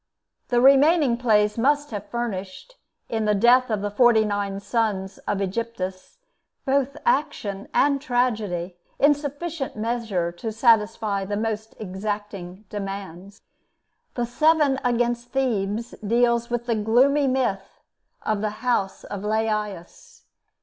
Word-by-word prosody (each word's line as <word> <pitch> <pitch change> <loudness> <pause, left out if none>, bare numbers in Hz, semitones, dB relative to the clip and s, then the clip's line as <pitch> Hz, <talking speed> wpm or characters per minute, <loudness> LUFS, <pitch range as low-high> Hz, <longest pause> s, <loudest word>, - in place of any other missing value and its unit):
The 245 - +2
remaining 275 0 +5
plays 215 -3 +2
must 290 +3 +2
have 205 -1 -6
furnished, 225 - -5 0.3
in 220 -2 -2
the 210 0 +2
death 245 +5 +4
of 215 -3 -1
forty 230 -2 +5
nine 205 -1 -2
of 200 - -6
the - - -22
sons 205 -5 -1
of 205 -1 0
Aegyptus, 195 - -4 0.5
both 275 0 0
action 205 - -1
and 280 -1 +2
tragedy 215 - -1 0.2
in 290 +1 +5
sufficient 290 +1 -5
measure 215 -6 -2
to 195 +6 -5
satisfy 220 -3 +2
the 205 +1 -3
most 220 0 -3
exacting 200 -1 -5
demands. 195 -1 -7 0.7
The 240 - 0
'Seven 290 +2 +3
Against 240 0 0
Thebes' 230 -3 -1
deals 235 +2 +2
with 240 0 -2
the 240 - 0
gloomy 250 +7 +3
myth 255 -7 -1 0.4
of 215 -2 -1
the 215 +2 -4
house 200 -6 0
of 200 - -6
Laïus. 215 - -3
225 Hz, 130 wpm, -24 LUFS, 200-250 Hz, 0.7 s, remaining